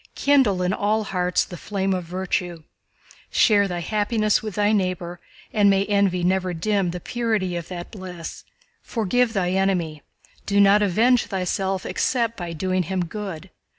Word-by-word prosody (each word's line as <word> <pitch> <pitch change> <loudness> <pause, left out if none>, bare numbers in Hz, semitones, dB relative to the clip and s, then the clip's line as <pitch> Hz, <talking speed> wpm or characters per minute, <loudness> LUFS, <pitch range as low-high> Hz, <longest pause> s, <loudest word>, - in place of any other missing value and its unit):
Kindle 260 -10 +3
in 180 +1 +1
all 215 +2 +1
hearts 180 -2 0
the 180 - -9
flame 195 +1 -2
of 180 -2 -3
virtue. 175 -1 -3 0.7
Share 205 -2 +4
thy 175 -2 -4
happiness 215 +2 +1
with 215 -4 -6
thy 205 0 +2
neighbor, 185 -4 -1 0.3
and 205 -1 +4
may 195 0 +3
envy 200 -3 +1
never 185 0 +1
dim 195 +1 0
the 180 +1 -4
purity 220 -4 -1
of 170 -2 -5
that 175 -1 -7
bliss. 180 -5 -8 0.4
Forgive 235 +1 0
thy 180 -4 0
enemy, 180 -5 0 0.5
do 200 0 +2
not 200 +1 +6
avenge 220 +5 +3
thyself 190 0 -2
except 230 -3 0
by 175 -4 -5
doing 185 +3 -1
him 180 +1 -2
good. 190 -2 -7
190 Hz, 155 wpm, -23 LUFS, 180-210 Hz, 0.7 s, not